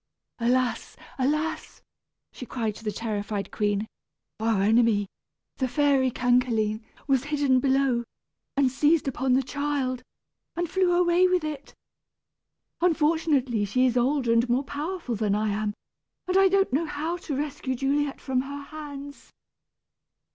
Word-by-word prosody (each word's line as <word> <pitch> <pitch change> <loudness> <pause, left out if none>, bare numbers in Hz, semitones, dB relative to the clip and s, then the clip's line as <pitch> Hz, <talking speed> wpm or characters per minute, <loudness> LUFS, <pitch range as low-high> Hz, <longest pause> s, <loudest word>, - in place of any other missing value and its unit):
"Alas! 245 0 0 0.2
alas!" 305 +5 -1 0.5
she - - -9
cried 230 -3 -3
to 225 - -13
the 215 - -1
terrified 205 -2 -3
queen, 205 0 0 0.5
"our 220 -3 +1
enemy, 220 -1 +3 0.5
the 260 - 0
fairy 275 -1 +2
Cancaline, 240 -3 +1 0.2
was 270 -2 +1
hidden 285 -3 +2
below, 265 -2 +2 0.5
and 270 -2 +3
seized 295 +3 +2
upon 265 0 0
the 265 +1 +3
child, 275 -2 -2 0.5
and 345 0 -1
flew 370 +1 +2
away 355 +1 +4
with 365 -2 +1
it. 295 -2 -6 1.1
Unfortunately 305 -8 +2
she 255 +6 +2
is 250 -2 +1
older 250 -1 +2
and 235 +1 +2
more 250 +3 +2
powerful 300 0 -4
than 210 -2 0
I 215 +1 0
am, 205 0 -2 0.5
and 365 - -1
I 385 0 +6
don't 390 -6 +2
know 320 +4 +1
how 315 +4 -3
to 310 -5 -5
rescue 275 -3 -3
Juliet 275 +2 0
from 260 -2 -1
her 280 +1 -7
hands." 285 -1 -9
265 Hz, 140 wpm, -26 LUFS, 235-295 Hz, 1.1 s, I